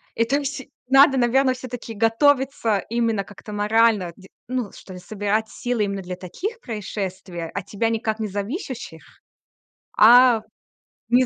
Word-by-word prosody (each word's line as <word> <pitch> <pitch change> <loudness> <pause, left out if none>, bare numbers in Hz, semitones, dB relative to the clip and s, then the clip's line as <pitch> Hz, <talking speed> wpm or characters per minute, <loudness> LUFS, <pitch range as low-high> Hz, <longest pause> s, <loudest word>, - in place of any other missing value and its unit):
Это 245 +6 +1
вс 280 0 -4 0.3
надо, 270 0 +6
наверное, 255 +2 +3
всё-таки 245 -2 -7
готовиться 230 0 +2
именно 230 -3 0
как-то 205 +1 -11
морально, 210 -3 +2
де 190 -1 -15 0.2
ну, 250 -5 -2
что - - -13
ли, 180 - -9
собирать 210 +2 -2
силы 240 -3 -2
именно 200 -1 -4
для 180 0 -7
таких 385 - -6
происшествий, 190 - -5
от 195 -1 -5
тебя 220 +3 -1
никак 225 -1 -2
не 215 - -2
зависящих, 205 - -5 1.0
а 240 +1 +7 0.7
не 250 +1 +4
225 Hz, 140 wpm, -22 LUFS, 200-255 Hz, 1.0 s, а